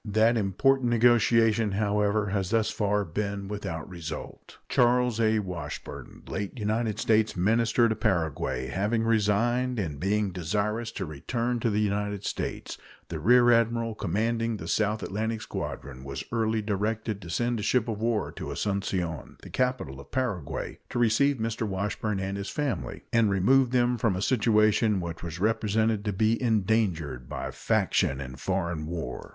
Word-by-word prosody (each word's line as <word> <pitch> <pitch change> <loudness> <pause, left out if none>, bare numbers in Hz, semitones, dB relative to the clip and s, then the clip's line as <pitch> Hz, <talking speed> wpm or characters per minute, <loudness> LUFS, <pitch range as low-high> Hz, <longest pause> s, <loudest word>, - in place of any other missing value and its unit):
That 110 +2 +3
important 120 +5 +2
negotiation, 115 -2 +4
however, 105 0 +1
has 95 -2 -1
thus 110 0 +1
far 105 -1 0
been 100 +3 -3
without 90 -6 -5
result. 85 -4 -8
Charles 125 -1 +3
A. 110 -1 +3
Washburn, 90 -7 -6
late 100 +5 -4
United 110 0 -1
States 110 -2 +2
minister 115 +5 +3
to 110 - +1
Paraguay, 80 - -1
having 105 - 0
resigned, 115 +3 +1
and 80 -9 -3
being 100 +3 0
desirous 105 +6 -2
to 95 - -3
return 115 - -2
to 115 - +1
the 105 0 +1
United 105 -1 -1
States, - - -4 0.3
the 80 -2 -4
rear 120 +7 +5
admiral 115 0 +2
commanding 115 +4 -1
the - - -7
South 110 0 0
Atlantic 110 +2 -2
Squadron 65 -1 -6
was 70 0 -5
early 110 -2 0
directed 105 +1 -2
to 85 - -9
send 120 +5 0
a - - -2
ship 120 +2 +1
of 110 -2 -3
war 115 -2 0
to - - -7
Asuncion, 95 -6 -2
the - - -10
capital 125 - -1
of 70 - -12
Paraguay, 115 - -3
to - - -4
receive 120 +5 +3
Mr. 110 0 -3
Washburn 100 +1 -2
and 95 +1 -3
his 100 0 -4
family 145 -4 -3
and 115 -2 +4
remove 120 +7 +4
them 125 -1 +2
from 110 -4 +1
a 95 - -3
situation 110 -2 +3
which 85 -2 -5
was 85 0 -6
represented 110 0 +1
to 105 - 0
be 110 +5 +1
endangered 100 - 0
by - - -4
faction 65 - +1
and 65 -1 -7
foreign 85 -4 -2
war. 85 -1 -5
105 Hz, 155 wpm, -27 LUFS, 95-115 Hz, 0.3 s, rear